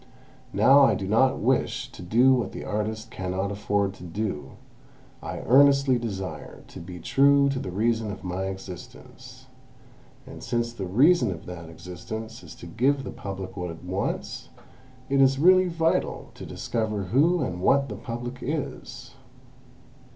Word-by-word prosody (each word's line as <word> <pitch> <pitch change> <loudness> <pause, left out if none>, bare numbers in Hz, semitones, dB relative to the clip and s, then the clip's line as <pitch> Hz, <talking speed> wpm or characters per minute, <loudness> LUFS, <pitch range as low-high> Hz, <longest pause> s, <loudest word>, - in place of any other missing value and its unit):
Now, 140 +2 +6
I 115 -7 +5
do 95 0 -4
not 120 +6 +3
wish - - 0
to - - -11
do 120 +9 +4
what 120 -6 -1
the - - -7
artist 110 +1 -3
cannot 95 +2 -3
afford 100 -1 0
to 95 - -13
do, 90 -3 -4 0.7
I - - -5
earnestly 140 -1 +5
desire 95 -5 -6
to - - -10
be 90 +1 -9
true 140 +8 +4
to 135 -1 -2
the - - -5
reason 110 +3 0
of 100 - -9
my 95 +1 -3
existence; 95 -2 -9 0.8
and - - -11
since 120 0 -2
the 95 -5 -5
reason 145 - +4
of 85 -4 -6
that 85 -2 -8
existence 110 +8 -8
is - - -12
to - - -11
give 135 +11 +1
the - - -6
Public 95 -1 -7
what 90 -2 -4
it 85 0 -9
wants, 95 +2 -4 0.6
it 135 0 +2
is 135 0 +4
really 185 +4 +5
vital 165 -1 -1
to - - -9
discover 110 -3 -2
who 150 - +2
and 90 -1 -4
what 140 +7 +3
the 105 - -6
Public 120 +4 -6
is!" 150 +1 -5
110 Hz, 160 wpm, -26 LUFS, 95-135 Hz, 0.8 s, Now